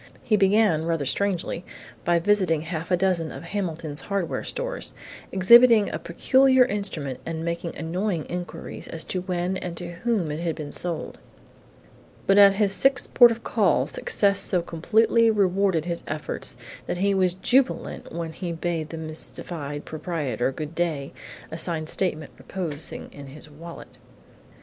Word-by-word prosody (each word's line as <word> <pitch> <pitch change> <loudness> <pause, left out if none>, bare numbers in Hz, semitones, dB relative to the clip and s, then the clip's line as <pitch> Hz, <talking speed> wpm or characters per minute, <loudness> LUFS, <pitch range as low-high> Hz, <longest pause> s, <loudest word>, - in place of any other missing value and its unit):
He 215 - +2
began, 195 -5 +3
rather 165 -4 -1
strangely, 185 +1 -1 0.4
by 175 0 +3
visiting 175 -3 +2
half 165 0 -5
a 180 - +3
dozen 175 -3 0
of - - -8
Hamilton's 165 -5 -4
hardware 195 -5 -2
stores, - - -4 0.4
exhibiting 230 +3 +6
a - - -3
peculiar 260 +8 +4
instrument 170 - -3
and 165 0 -4
making 170 0 -3
annoying 175 +1 -2
inquiries 175 0 -6
as 165 -1 -3
to 185 - -3
when 180 0 -2
and 175 -2 -6
to 175 -1 -6
whom 205 -8 -1
it 150 - -4
had 165 -2 -2
been 150 -2 -7
sold. 175 -2 -3 1.1
But 195 +1 +5
at 200 -1 +8
his 200 -1 +3
sixth 270 +3 +3
port 240 -1 +8
of 230 0 -4
call - - +2
success 200 - +1
so 180 -3 +2
completely 220 +8 +2
rewarded 195 -5 +2
his 170 -1 -2
efforts 155 -1 -5 0.3
that - - -2
he 200 +2 +2
was 185 -2 +2
jubilant 250 +7 0
when 165 -1 -5
he 175 +1 -5
bade 165 -2 -3
the 165 - -6
mystified 155 -1 -4
proprietor 150 - -2
good 150 +3 -6
day, 160 -5 -2 0.4
a 160 - -5
signed 160 -2 -1
statement 160 -6 0
reposing 160 -5 -4
in 140 -1 -10
his 150 +2 -10
wallet. 165 +3 -11
175 Hz, 155 wpm, -25 LUFS, 160-200 Hz, 1.1 s, at